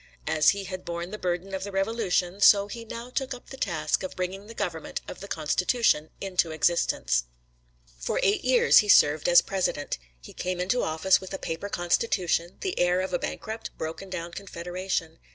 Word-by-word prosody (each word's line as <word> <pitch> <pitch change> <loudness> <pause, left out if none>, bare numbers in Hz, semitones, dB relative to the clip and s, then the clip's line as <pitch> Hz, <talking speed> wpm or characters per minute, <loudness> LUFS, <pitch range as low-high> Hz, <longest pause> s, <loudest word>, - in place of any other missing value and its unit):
As 155 -1 +4
he 200 0 0
had 185 -1 -6
borne 170 +1 -5
the 215 - -6
burden 180 +2 -2
of 190 0 -3
the 200 - -5
Revolution, 195 -2 0
so 200 0 +7
he 230 +2 -7
now 235 +2 -7
took 265 -1 -2
up 245 - -15
the - - -6
task 160 - -1
of 185 - -5
bringing 190 +3 -4
the 230 - -10
government 170 -7 -3
of - - -8
the 200 - -8
Constitution 160 +1 +1
into 185 -3 0
existence. 150 - +1 0.7
For - - -1
eight 200 +2 +2
years 255 -1 +6
he 210 - 0
served 150 -4 +5
as 175 - +7
president. 180 - -2 0.2
He - - -13
came 180 0 -3
into 195 +8 +1
office 160 +5 +2
with 190 +1 -6
a - - -3
paper 165 +3 -4
constitution, 175 -1 0
the 380 -2 -2
heir 180 +1 +3
of 190 0 -3
a - - +1
bankrupt, 220 +1 -6
broken 165 +5 -5
down 170 -2 -5
confederation. 175 -2 -4
185 Hz, 190 wpm, -27 LUFS, 170-200 Hz, 0.7 s, so